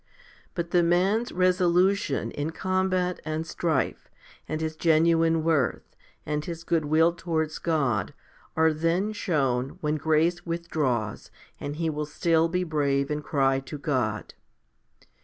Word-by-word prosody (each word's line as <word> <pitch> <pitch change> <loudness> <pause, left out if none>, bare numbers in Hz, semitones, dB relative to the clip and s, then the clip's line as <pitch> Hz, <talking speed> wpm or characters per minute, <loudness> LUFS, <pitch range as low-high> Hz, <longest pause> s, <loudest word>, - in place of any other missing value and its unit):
But 170 -1 -3
the 175 - +4
man's 190 +7 +2
resolution 180 - +2
in 145 +2 -3
combat 185 -1 0
and 155 +1 -3
strife, 165 0 -2 0.4
and 155 - -2
his 160 0 -3
genuine 165 0 +3
worth, 155 -6 0 0.3
and 150 0 -2
his 165 0 -6
goodwill 160 +1 +2
towards 160 -3 -2
God, 140 - 0 0.4
are 160 0 +4
then 170 +7 0
shown 135 -10 -1
when 150 0 0
grace 160 +3 +1
withdraws 150 - -2 0.3
and 145 - -5
he 165 +1 -1
will 150 -1 -2
still 165 +2 +2
be 180 +2 0
brave 140 -4 0
and 150 0 -2
cry 135 -2 +1
to 135 +3 -8
God. 125 -8 -2
160 Hz, 130 wpm, -26 LUFS, 150-170 Hz, 0.4 s, the